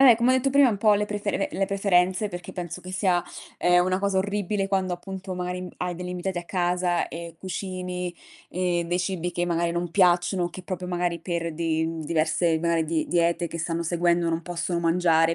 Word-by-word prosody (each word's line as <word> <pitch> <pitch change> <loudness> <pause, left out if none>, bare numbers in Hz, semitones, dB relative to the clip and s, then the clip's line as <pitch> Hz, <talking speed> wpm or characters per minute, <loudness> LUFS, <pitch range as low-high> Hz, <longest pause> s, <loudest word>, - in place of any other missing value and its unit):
Eh, 260 -4 +9
come 235 +3 +2
ho - - +4
detto 260 +1 +1
prima 280 -1 +6
un 210 - 0
po' 210 +1 +4
le 210 0 0
prefere 205 -1 -1
le 195 - 0
preferenze 195 0 +2
perché 175 -1 -7
penso 180 0 -5
che 185 +1 -9
sia, 185 -3 +2 0.4
ehm, 180 0 +4
una 185 0 +1
cosa 200 -1 +1
orribile 200 0 -1
quando 190 -2 0
appunto 190 +1 -6
magari, 180 0 -3
mhmm, 180 - -7
hai 180 -1 -2
degli 180 0 -5
invitati 180 0 -3
a 175 - -6
casa 180 -1 0
e 170 0 -7
cucini, 180 -1 -4 0.4
ehm, 175 -1 0
dei 175 +1 0
cibi 180 -1 -2
che 175 - 0
magari 170 -1 0
non 175 0 -2
piacciono 180 0 +3
o 175 - -3
che 185 +2 -9
proprio 185 0 -5
magari 175 -1 -1
per 170 -1 -3
di 160 0 0 0.2
diverse 160 +1 +1
magari 170 -1 +1
di 160 0 -1
diete 170 0 +1
che 170 - -6
stanno 165 +1 -1
seguendo 170 0 +1
non 165 0 0
possono 175 0 -2
mangiare, 165 -1 +3
180 Hz, 205 wpm, -25 LUFS, 170-190 Hz, 0.4 s, Eh